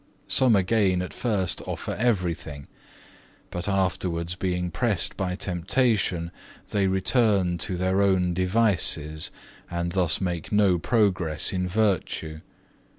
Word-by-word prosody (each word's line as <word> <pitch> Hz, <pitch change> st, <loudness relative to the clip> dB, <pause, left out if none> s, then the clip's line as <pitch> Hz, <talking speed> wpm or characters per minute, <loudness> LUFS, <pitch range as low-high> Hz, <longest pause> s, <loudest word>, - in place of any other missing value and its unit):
Some 125 Hz, -4 st, +4 dB
again 95 Hz, -2 st, +2 dB
at 90 Hz, -, -7 dB
first 100 Hz, -7 st, -1 dB
offer -, -, -4 dB
everything; 85 Hz, -, -2 dB, 0.9 s
but 90 Hz, +3 st, -4 dB
afterwards 90 Hz, -3 st, -1 dB
being 90 Hz, -1 st, -2 dB
pressed 100 Hz, +1 st, 0 dB
by 90 Hz, -2 st, -2 dB
temptation 90 Hz, -1 st, 0 dB, 0.4 s
they 100 Hz, -2 st, +1 dB
return 95 Hz, -2 st, +2 dB
to 90 Hz, +3 st, -1 dB
their 95 Hz, +2 st, +1 dB
own 95 Hz, -3 st, +2 dB
devices, 90 Hz, -5 st, +1 dB, 0.4 s
and 85 Hz, 0 st, -3 dB
thus 90 Hz, -3 st, +1 dB
make 90 Hz, -4 st, -3 dB
no 100 Hz, -4 st, +3 dB
progress 95 Hz, -8 st, +1 dB
in 90 Hz, -1 st, -1 dB
virtue. 90 Hz, -6 st, -1 dB
95 Hz, 115 wpm, -25 LUFS, 85-100 Hz, 0.9 s, Some